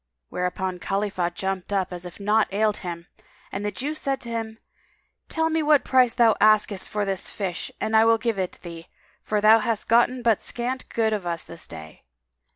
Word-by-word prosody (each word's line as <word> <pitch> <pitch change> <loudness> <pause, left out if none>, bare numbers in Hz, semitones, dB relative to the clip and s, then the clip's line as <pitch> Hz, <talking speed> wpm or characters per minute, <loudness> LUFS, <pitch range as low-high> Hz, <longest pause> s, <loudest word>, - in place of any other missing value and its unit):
Whereupon 180 0 -3
Khalifah 195 -2 -1
jumped 190 0 -3
up, 190 -2 -1
as 180 0 -6
if 175 - -12
naught 210 +2 +2
ailed 210 +1 +1
him, 170 -2 -6 0.5
and 195 - -4
the 205 - 0
Jew 270 +9 -3
said 275 -3 -2
to 235 - -4
him, 225 -1 -4 0.7
"Tell 320 0 0
me 320 0 +1
what 295 -3 +4
price 255 -2 +4
thou 235 -3 +5
asketh 210 -2 +3
for 210 -1 -2
this 195 -2 -2
fish 190 -4 -4
and 220 - -1
I 220 0 +6
will 230 0 +5
give 225 -3 -2
it 185 -1 -2
thee: 165 -1 -9 0.3
for 210 -1 -1
thou 220 +2 +7
hast 225 -1 -2
gotten 240 +2 +3
but 225 -3 +3
scant 250 +2 -3
good 220 -1 +1
of 200 -4 -3
us 170 -1 -2
this 165 -1 -10
day." 80 -1 -10
210 Hz, 195 wpm, -24 LUFS, 185-230 Hz, 0.7 s, thou